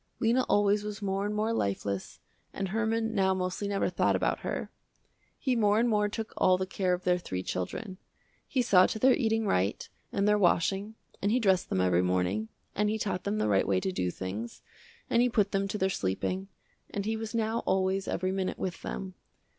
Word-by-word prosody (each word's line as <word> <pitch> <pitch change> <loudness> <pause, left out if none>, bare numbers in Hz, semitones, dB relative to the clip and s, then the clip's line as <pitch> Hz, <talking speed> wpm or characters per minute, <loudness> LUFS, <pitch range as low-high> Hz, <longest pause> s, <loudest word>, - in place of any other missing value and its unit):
Lena 240 +1 +3
always 205 0 +3
was 210 0 -6
more 195 +1 -1
and 210 - -3
more 215 +2 0
lifeless 100 - -2 0.3
and 195 -1 -3
Herman 225 +1 0
now 190 -2 +2
mostly 185 +2 -2
never 200 -1 0
thought - - +2
about - - 0
her. - - -4 0.7
He 260 -3 0
more 210 -2 +3
and 240 - +3
more 210 -2 +2
took 220 +1 -5
all 185 0 +4
the 190 - -1
care 185 -1 0
of 180 - -11
their 180 0 +2
three 95 - -4
children. 185 - -4 0.5
He 260 -4 +1
saw 185 -6 +6
to - - -3
their 255 +4 +5
eating 225 -4 +1
right 95 - 0 0.2
and 200 0 +1
their 210 0 +4
washing, 195 +3 +1 0.3
and 200 - +1
he 245 - +3
dressed 190 -6 +2
them 95 - +1
every 90 -1 +3
morning, 90 +4 0 0.2
and 210 +1 +1
he 220 - 0
taught 195 -4 -3
them 205 +1 0
the - - +1
right 100 -2 +2
way 95 -1 +2
to 95 - -2
do 90 -1 -1
things, 100 +6 -6 0.4
and 235 - +3
he 250 - +3
put 210 -4 +1
them 195 0 0
to 205 - -3
their 190 - +2
sleeping, 185 - -2 0.4
and 200 -1 -3
he 220 +1 0
was 220 +1 -5
now 225 0 0
always 190 +1 +1
every 185 +1 -1
minute 190 -1 -2
with 185 -2 -4
them. 190 -1 -5
195 Hz, 210 wpm, -29 LUFS, 180-215 Hz, 0.7 s, saw